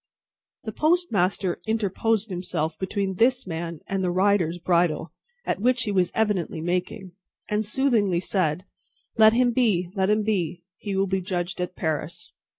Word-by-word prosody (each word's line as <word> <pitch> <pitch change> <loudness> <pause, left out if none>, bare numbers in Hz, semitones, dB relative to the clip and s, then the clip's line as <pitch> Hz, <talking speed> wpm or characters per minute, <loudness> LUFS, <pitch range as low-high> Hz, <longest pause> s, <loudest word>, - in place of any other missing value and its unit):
The 220 - -4
postmaster 210 - +1
interposed 220 0 0
himself 170 -3 -2
between 190 0 -2
this 250 +3 +3
man 170 -2 -5
and 195 -1 -2
the 180 - +1
rider's 185 -2 +2
bridle 170 -2 +1 0.3
(at - - -1
which 250 +1 +2
he 210 - -2
was 185 -3 +1
evidently 205 -7 0
making), 180 +3 -3 0.4
and 210 +1 0
soothingly 210 -5 +1
said, 180 -2 -1 0.5
"Let 220 0 +8
him 245 +1 +3
be; 205 -8 +1
let 190 -1 +1
him 210 0 +2
be! 180 -5 -1
He 200 -2 -4
will 195 +1 +2
be 190 0 -1
judged 175 -1 -3
at 180 +1 -4
Paris." 160 +1 -4
190 Hz, 155 wpm, -25 LUFS, 175-215 Hz, 0.5 s, Let